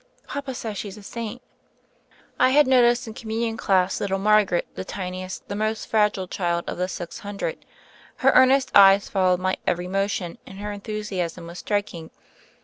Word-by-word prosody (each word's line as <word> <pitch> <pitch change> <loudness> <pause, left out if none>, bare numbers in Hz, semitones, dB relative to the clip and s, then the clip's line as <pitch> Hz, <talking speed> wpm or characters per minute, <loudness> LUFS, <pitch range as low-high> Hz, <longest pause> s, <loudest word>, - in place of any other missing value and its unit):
Papa 280 -2 -5
says 220 -4 -5
she's 205 0 -6
a 210 - -12
saint." 235 +3 -6 1.0
I - - +5
had 290 +3 +5
noticed 245 -1 +4
in 220 - -8
Communion 225 0 -3
dass 190 -3 +1
little 195 -1 0
Margaret, 205 -3 +3
the - - -5
tiniest, 185 -1 -6
the 200 - -4
most 215 +1 -1
fragile 210 -3 +1
child 170 -2 -2
of - - -5
the 180 - 0
six 175 -2 -7
hundred. 205 - -5 0.5
Her - - +3
earnest 260 +1 +5
eyes 195 0 +7
followed 185 -2 +2
my 185 0 0
every 175 +1 0
motion, 195 -2 -2
and 190 - -10
her 210 +1 -5
enthusiasm 200 -5 -4
was 170 +1 -9
striking. 205 -6 -3
205 Hz, 165 wpm, -24 LUFS, 185-220 Hz, 1.0 s, eyes